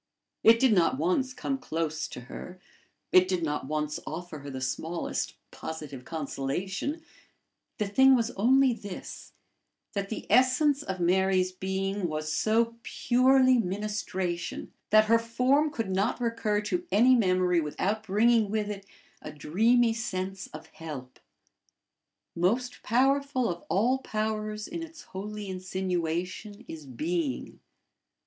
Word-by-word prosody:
It 230 +1 +7
did 260 -3 +4
not 170 -8 +3
once 185 - +1
come 270 +1 -3
close 160 - -2
to - - -8
her; 180 +8 -9 0.5
it 185 0 +6
did 185 -2 -1
not 150 -3 -2
once 150 0 -2
offer 165 -1 -6
her 140 0 -8
the 130 -1 -5
smallest 160 +6 -3 0.2
positive 150 -5 -7
consolation; 180 - -3 0.7
the 210 - -1
thing 265 +6 +6
was 235 -1 0
only 255 +5 +4
this, 205 -4 -9 0.6
that 200 -1 -3
the 220 - -5
essence 265 +3 +4
of 190 -8 -4
Mary's 185 +1 +2
being 190 +1 -2
was 155 0 -3
so 230 +7 +1
purely 255 +1 +4
ministration, 190 -3 -3 0.2
that 215 0 +6
her 230 +1 +4
form 255 +6 +2
could 225 -9 -3
not 200 +7 0
recur 230 -3 0
to 350 +12 -2
any 245 +5 +6
memory 185 -6 +3
without 195 +8 -1
bringing 220 +1 +3
with 210 0 -1
it 200 -1 -8 0.3
a - - -7
dreamy 225 - +2
sense 195 -3 -4
of 155 - -10
help. 140 -6 -8 1.2
Most 230 +9 0
powerful 270 +2 +2
of 170 - -7
all 230 +10 +2
powers 215 -2 -3
in 335 - -5
its 330 0 -9
holy 210 +2 -6
insinuation 185 +3 -3
is 155 -3 -9
being. 150 +2 -3
200 Hz, 130 wpm, -28 LUFS, 175-235 Hz, 1.2 s, It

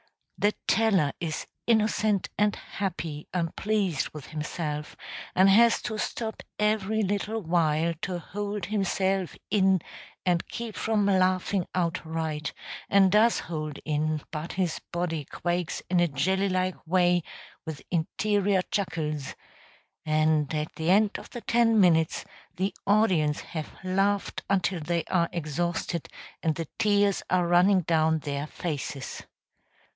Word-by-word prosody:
The 205 +1 +2
teller 195 -11 +3
is 160 -3 -3 0.2
innocent 215 -3 +2
and 210 0 +2
happy 170 -6 -5
and 170 -3 -2
pleased 195 -8 0
with 150 -3 -9
himself, 150 -1 -4 0.4
and 190 +1 +6
has 230 +4 +6
to 215 -2 -3
stop 220 +1 -3 0.2
every 215 0 +1
little 205 +3 -1
while 165 -1 +2
to 185 -2 -2
hold 205 +2 -4
himself 195 -2 0 0.2
in 190 -2 +4 0.5
and 175 -2 +1
keep 230 -2 -6
from 215 -2 +1
laughing 185 -1 +2
outright; 160 -3 -2 0.4
and 195 -2 +5
does 220 +3 +4
hold 155 -3 -5
in, 155 0 0
but 155 +1 -5
his 180 -4 -1
body 170 -4 -2
quakes 175 +2 -2
in 180 -1 +2
a 175 - +4
jelly 190 +7 +1
like 185 -2 -1
way 175 0 +3 0.4
with 160 -2 -7
interior 195 +3 +1
chuckles; 155 -7 -2 0.7
and 155 -1 +2
at 150 0 -3
the 160 +1 -1
end 205 +2 +4
of - - -12
the 240 - -7
ten 230 0 +3
minutes 165 -4 +3 0.3
the 190 +3 -1
audience 185 -8 +3
have 155 -3 -6
laughed 195 +2 0
until 185 -2 +1
they 170 +2 -1
are 170 -2 +1
exhausted, 170 +1 -2 0.3
and 160 -2 +1
the 165 -2 -4
tears 205 -2 +3
are 180 -1 +3
running 180 +3 +5
down 160 -1 +2
their 145 -1 -3
faces. 145 -5 -5
180 Hz, 130 wpm, -27 LUFS, 160-200 Hz, 0.7 s, and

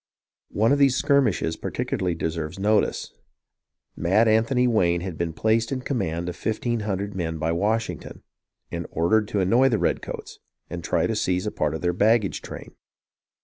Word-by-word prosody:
One 110 +4 +2
of 145 - +3
these 135 -2 +5
"skirmishes" 125 - +2
particularly 90 +1 -2
deserves 80 0 -3
notice. 105 +2 +1 0.8
Mad 100 +7 +3
Anthony 115 +3 +3
Wayne 85 -7 +2
had 90 -2 -5
been 85 +1 -2
placed 110 - +1
in 130 -1 -2
command 85 - -2
of 90 - -4
fif 110 +3 -2
teen 120 -1 -1
hundred 100 -1 -3
men 80 -4 -3
by 80 +1 -1
Washington, 110 +6 -2 0.5
and 85 -1 -4
ordered 105 +7 +2
to 105 -2 0
annoy 120 +8 +4
the 115 - +1
redcoats, - - -3 0.3
and 85 -1 -5
to - - -7
try - - +2
to - - -1
seize 90 +2 0
a 105 - -1
part 75 0 -1
of - - -5
their 90 0 +1
baggage 105 +2 +2
train. - - -9
100 Hz, 175 wpm, -24 LUFS, 85-115 Hz, 0.8 s, these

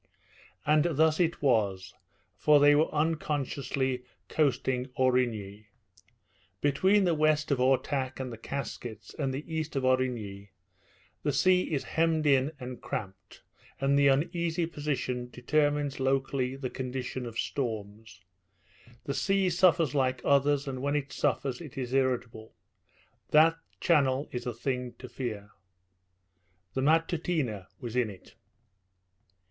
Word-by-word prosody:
And 150 +1 +4
thus 160 +2 +3
it 170 -3 0
was, 100 -8 +1 0.4
for 150 +8 +5
they 145 +1 +7
were 150 +2 +3
unconsciously 140 -4 -1 0.3
coasting 130 -3 +1
Aurigny. 115 -5 0 0.9
Between 190 +9 +3
the 175 -2 +3
west 155 -1 +2
of 135 - +2
Ortach 130 +1 +1
and 130 -2 -4
the - - -8
Caskets 115 -5 -6
and 135 -3 -2
the 135 +3 -5
east 160 -2 -4
of 135 - 0
Aurigny 120 -6 -1 0.7
the 145 - 0
sea 180 +6 +3
is 145 -4 0
hemmed 160 -1 +1
in 135 0 +3
and 125 -1 -7
cramped, 95 -1 -7 0.4
and 135 +1 +2
the 140 0 +5
uneasy 165 +4 +1
position 140 -6 -3
determines 145 +2 0
locally 135 -1 0
the 135 -2 -5
condition 130 -1 -4
of 115 -1 -8
storms. 110 -6 -4 0.8
The 140 - -3
sea 195 +2 +1
suffers 170 -5 +3
like 130 -2 +1
others, 140 0 +3
and 130 -1 -4
when 140 +1 0
it 145 -1 -2
suffers 140 0 -1
it 150 -3 -10
is 125 -1 -4
irritable. 125 -5 -1 0.7
That 160 +2 +6 0.2
channel 140 -4 +2
is 125 0 -5
a 120 - -2
thing 125 0 -3
to 130 - -9
fear. 115 -4 -5 1.2
The 130 - -1
Matutina 155 - 0
was 120 -3 -6
in 125 -3 +2
it. 95 -3 -13
135 Hz, 130 wpm, -29 LUFS, 125-150 Hz, 1.2 s, they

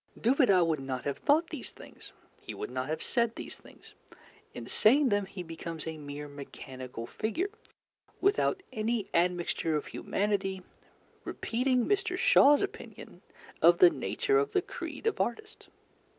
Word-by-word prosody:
Dubedat 225 - +4
would 160 -3 0
not 130 -1 -4
have 140 -1 -3
thought 315 +4 +2
these 300 -6 -5
things, - - -14 0.3
he - - -8
would - - -6
not 130 +1 -3
have 155 +1 -3
said 235 -2 0
these - - -7
things; - - -17 0.6
in - - -8
saying 265 +5 +4
them 205 -2 +1
he 190 -1 -7
becomes 165 -1 -7
a 160 -1 -5
mere 145 0 -7
mechanical 130 -4 -8
figure, 270 - -2 0.7
without 395 -1 +1
any 220 -1 -1
admixture 170 -2 +1
of 150 - -2
humanity, 195 -2 -2 0.6
repeating 250 +1 0
Mr. 390 -3 0
Shaw's 370 - +6
opinion 405 +3 -8 0.4
of - - +7
the 365 -3 +7
nature 415 +4 0
of 430 - -1
the 380 - +3
creed - - -7
of 445 - +1
artists. 435 0 -4
210 Hz, 150 wpm, -30 LUFS, -, 0.7 s, of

